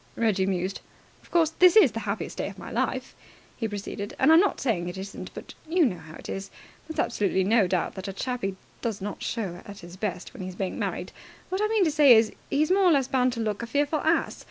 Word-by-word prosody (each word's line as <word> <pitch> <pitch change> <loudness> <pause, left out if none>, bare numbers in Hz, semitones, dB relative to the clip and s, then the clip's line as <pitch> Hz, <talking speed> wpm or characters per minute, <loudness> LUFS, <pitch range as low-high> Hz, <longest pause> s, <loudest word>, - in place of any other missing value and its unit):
Reggie 200 -5 +1
mused. 185 0 -2 0.4
"Of - - -21
course, 330 -2 +3
this 365 +1 +7
is 400 - +7
the 225 - -4
happiest 200 - -4
day - - -1
of - - -12
my - - -9
life," - - -2 0.4
he 225 - -2
proceeded, 205 0 -6
"and 315 - +5
I'm 325 - +8
not 400 +2 +2
saying 180 -9 -1
it 175 - -7
isn't, 195 +1 -7
but - - -9 0.2
you 345 -1 +4
know 185 -9 -1
how 155 0 -12
it - - -10
is 195 0 -5 0.4
there's 320 - -7
absolutely 190 -2 +1
no 210 0 +3
doubt 180 -2 -1
that 190 0 -7
a 195 - -4
chappie 200 -3 -3 0.3
does 225 -4 -2
not 200 +1 -6
show 190 -6 -3
at 200 0 -10
his 175 +1 -11
best 190 -3 -4
when - - -9
he's 185 -1 -6
being 190 -1 -3
married. - - -3 0.4
What 375 +2 -1
I 425 - +3
mean 435 -2 +2
to 320 - +2
say 290 -5 +7
is, 220 -1 +4 0.2
he's 305 +4 +1
more 390 +1 +4
or 355 - +6
less 275 -4 +3
bound 255 -2 +2
to 230 - -3
look 215 -1 -2
a 235 - -5
fearful 290 +4 +1
ass. 320 +2 +1
220 Hz, 245 wpm, -26 LUFS, 195-295 Hz, 0.4 s, I'm